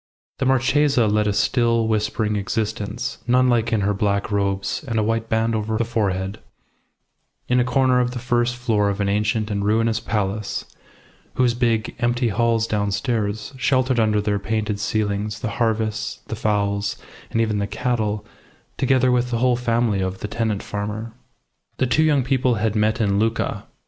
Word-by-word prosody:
The 135 - +1
Marchesa 135 0 +3
led 105 0 +2
a 105 - +1
still, 115 +1 +2
whispering 105 0 0
existence, 105 +3 -3
nun 125 +1 +4
like 115 -2 +1
in 110 -2 +2
her 100 +1 +1
black 100 +1 0
robes 100 +2 -1
and 115 -3 -1
a 110 - +2
white 115 +1 -1
band 110 +1 +1
over 110 0 -1
the 115 - 0
forehead, 100 -3 -1 1.1
in 125 0 +3
a - - +4
corner 125 0 +2
of 125 0 +1
the 125 - -6
first 120 0 0
floor 110 -4 +1
of 100 0 -3
an 100 - +1
ancient 105 +2 0
and 100 -1 -1
ruinous 110 +2 +2
palace, 105 -1 -2 0.7
whose 125 -2 +3
big, 115 -2 0
empty 120 0 +1
halls 115 +1 +1
downstairs 105 +1 -1
sheltered 130 -1 +2
under 110 -1 +3
their 105 -1 0
painted 110 0 -2
ceilings 105 0 -1
the 115 - -2
harvests, 110 0 -1
the 115 - -2
fowls, 100 -2 0 0.3
and 115 - -1
even 110 -2 +1
the 100 - -1
cattle, 110 -1 -1 0.5
together 130 -1 +3
with 125 0 +1
the 120 - 0
whole 125 +1 +3
family 115 -4 +1
of 95 0 -3
the - - -3
tenant 110 -2 -2
farmer. 105 +2 -4 0.6
The 130 - +2
two 130 +5 +2
young 150 -4 +3
people 125 -1 +1
had 110 0 -1
met 110 +2 +1
in 100 -3 +2
Lucca. 115 +1 -1
110 Hz, 170 wpm, -22 LUFS, 105-120 Hz, 1.1 s, nun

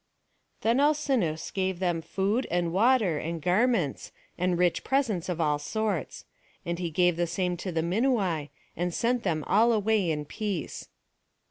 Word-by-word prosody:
Then 230 +4 +2
Alcinous 275 - +1
gave 190 -1 -1
them 175 -2 0
food, 200 +8 -1
and 170 -1 0
water, 210 - +3
and 165 +1 -4
garments, 180 - +1 0.2
and 180 0 0
rich 175 -1 +1
presents 235 -11 0
of 175 -2 -2
all 150 -2 +1
sorts; 210 +3 -3 0.4
and 170 0 -2
he 175 -2 -2
gave 175 +1 +2
the 175 0 +1
same 180 +1 -1
to 185 +2 -4
the 160 -1 -1
Minuai, 185 - 0 0.3
and 175 0 -2
sent 245 +1 +1
them 160 -7 -1
all 225 +5 +4
away 215 -4 +2
in 150 -2 -2
peace. 195 0 -4
180 Hz, 155 wpm, -28 LUFS, 170-220 Hz, 0.4 s, all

